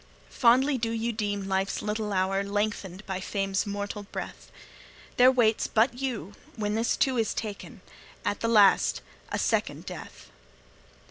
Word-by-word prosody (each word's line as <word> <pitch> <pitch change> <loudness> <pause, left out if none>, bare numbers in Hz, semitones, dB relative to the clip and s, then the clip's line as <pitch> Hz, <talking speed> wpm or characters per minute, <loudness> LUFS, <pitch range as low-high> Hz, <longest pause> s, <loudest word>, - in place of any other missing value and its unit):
Fondly 260 +3 +4
do 225 0 -1
ye 230 +1 -1
deem 205 -3 -2
life's 195 0 0
little 210 0 -2
hour 195 +1 +1
Lengthened 205 -1 -3
by 190 -1 -3
fame's 195 0 -1
mortal 205 +1 -4
breath; 205 - -8 0.7
There 250 - +7
but 260 - 0
waits 220 -2 +3 0.2
you 245 -5 -4 0.2
when 210 -2 -2
this, 225 +2 +1
too, 260 -3 +2
is 225 - 0
taken 210 -3 -6 0.4
At 205 - -1
the 230 - -1
last 210 -4 +5 0.3
a - - 0
second - - 0
death. - - -9
210 Hz, 145 wpm, -27 LUFS, 200-230 Hz, 0.7 s, There